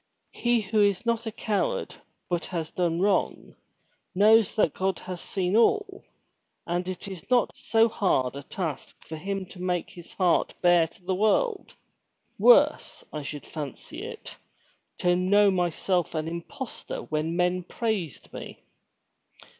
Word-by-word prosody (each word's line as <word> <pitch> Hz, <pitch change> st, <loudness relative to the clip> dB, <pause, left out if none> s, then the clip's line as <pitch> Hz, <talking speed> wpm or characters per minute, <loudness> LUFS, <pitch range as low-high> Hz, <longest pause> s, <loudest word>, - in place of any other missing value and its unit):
* -, -, -50 dB
He 240 Hz, -1 st, +1 dB
who 210 Hz, +1 st, +1 dB
is 200 Hz, +2 st, +2 dB
not 230 Hz, 0 st, 0 dB
a -, -, -2 dB
coward, 235 Hz, -, -1 dB, 0.3 s
but 175 Hz, -2 st, -1 dB
has 165 Hz, -4 st, -4 dB
done 175 Hz, -1 st, 0 dB
wrong, 200 Hz, -1 st, 0 dB, 0.6 s
knows 215 Hz, +2 st, +5 dB
that 210 Hz, -9 st, +2 dB
God 190 Hz, -1 st, -1 dB
has 180 Hz, -2 st, -7 dB
seen 190 Hz, 0 st, -1 dB
all, 415 Hz, -, +2 dB, 0.6 s
and 175 Hz, +1 st, -2 dB
it 185 Hz, +1 st, -5 dB
is 190 Hz, 0 st, -9 dB
not 250 Hz, -2 st, +2 dB
so 225 Hz, 0 st, +3 dB
hard 160 Hz, -, 0 dB
a 140 Hz, -, -5 dB
task 160 Hz, 0 st, -6 dB
for 160 Hz, -, -7 dB
him 195 Hz, +4 st, -4 dB
to 180 Hz, 0 st, -12 dB
make 180 Hz, -2 st, -1 dB
his 175 Hz, -1 st, -12 dB
heart 180 Hz, -3 st, +2 dB
bare 175 Hz, -2 st, +4 dB
to 170 Hz, -, -22 dB
the 190 Hz, -, 0 dB
world. 305 Hz, -, +1 dB, 0.6 s
Worse, -, -, +4 dB
I 150 Hz, -, -3 dB
should 145 Hz, 0 st, -7 dB
fancy 145 Hz, -5 st, -7 dB
it, -, -, -8 dB, 0.6 s
to 175 Hz, 0 st, +2 dB
know 200 Hz, +3 st, +4 dB
myself 180 Hz, -1 st, 0 dB
an 155 Hz, 0 st, -2 dB
impostor 170 Hz, +9 st, -6 dB
when 155 Hz, +2 st, -2 dB
men 180 Hz, +1 st, +1 dB
praised 190 Hz, -, -4 dB
me." -, -, -9 dB
185 Hz, 150 wpm, -27 LUFS, 170-215 Hz, 0.6 s, knows